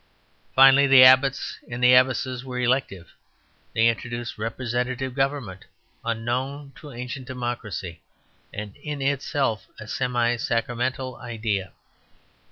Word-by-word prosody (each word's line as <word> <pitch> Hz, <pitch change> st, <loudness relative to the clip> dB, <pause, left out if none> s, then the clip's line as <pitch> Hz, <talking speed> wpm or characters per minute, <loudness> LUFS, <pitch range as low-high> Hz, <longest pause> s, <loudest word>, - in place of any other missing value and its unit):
Finally, 135 Hz, +1 st, +7 dB
the 135 Hz, -1 st, +8 dB
abbots 130 Hz, +1 st, +4 dB
and 125 Hz, +1 st, -1 dB
abbesses 125 Hz, 0 st, +3 dB
were 130 Hz, -1 st, -6 dB
elective. 120 Hz, -8 st, -1 dB, 0.6 s
They 115 Hz, +1 st, +4 dB
introduced 115 Hz, 0 st, -3 dB
representative 125 Hz, +3 st, -3 dB
government, 135 Hz, -8 st, -2 dB, 0.4 s
unknown 130 Hz, +5 st, -3 dB
to 150 Hz, -, -11 dB
ancient 125 Hz, +2 st, -7 dB
democracy, 120 Hz, -, -5 dB, 0.5 s
and 105 Hz, -1 st, -7 dB
in 145 Hz, -2 st, -5 dB
itself 135 Hz, -4 st, -1 dB
a 105 Hz, -, -9 dB
semi 120 Hz, 0 st, 0 dB
sacramental 125 Hz, +3 st, -2 dB
idea. 110 Hz, -6 st, -3 dB
125 Hz, 105 wpm, -24 LUFS, 115-130 Hz, 0.6 s, the